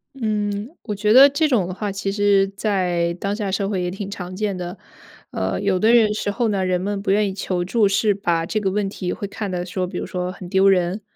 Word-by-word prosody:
嗯， 210 +1 -2
我 210 -3 -4
觉 210 +1 +2
得 270 +3 +9
这 305 +3 +1
种 215 -10 +1
的 185 - -5
话， 205 +1 -3
其 195 0 -3
实 200 -1 +3
在 185 -4 -1
当 200 +1 -2
下 205 -3 -3
社 195 +1 -1
会 190 -3 -1
也 180 - -2
挺 195 +1 -6
常 185 -2 -7
见 205 -2 -2
的。 180 +2 -6 0.5
呃， 95 - -2
有 195 -2 +1
的 220 +5 +4
人 220 -3 +5
时 205 - -2
候 235 +2 0
呢， 195 -3 0
人 180 -1 0
们 200 +1 -2
不 195 - 0
愿 205 0 +2
意 190 - -5
求 185 -2 -2
助， 205 +3 +2
是 205 +1 +2
把 170 -4 0
这 215 - -1
个 195 -2 -1
问 205 0 -1
题 185 -2 -4
会 200 - -5
看 200 0 -5
得 180 -1 -2
说 180 0 -3
比 180 - -5
如 - - -5
说 180 0 -3
很 180 -2 -10
丢 190 +1 +4
人， 185 +1 +2
195 Hz, 270 characters per minute, -21 LUFS, 185-210 Hz, 0.5 s, 得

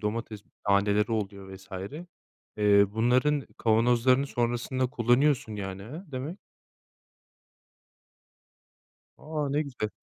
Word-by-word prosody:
domates 110 0 -3 0.3
taneleri 100 +2 +3
oluyor 100 -3 -4
vs. 95 - -17 0.9
eee, 100 -1 +5
bunların 125 +6 +2
kavanozlarını 120 +4 +3
sonrasında 120 +1 -1
kullanıyorsun, 120 -1 +2
yani, 95 -1 -5
he 150 - -8
demek? 145 +9 -5 2.8
A. 150 -1 -3
Ne 145 +2 +1
güzel. 125 -7 -4
115 Hz, 90 wpm, -28 LUFS, 105-130 Hz, 2.8 s, eee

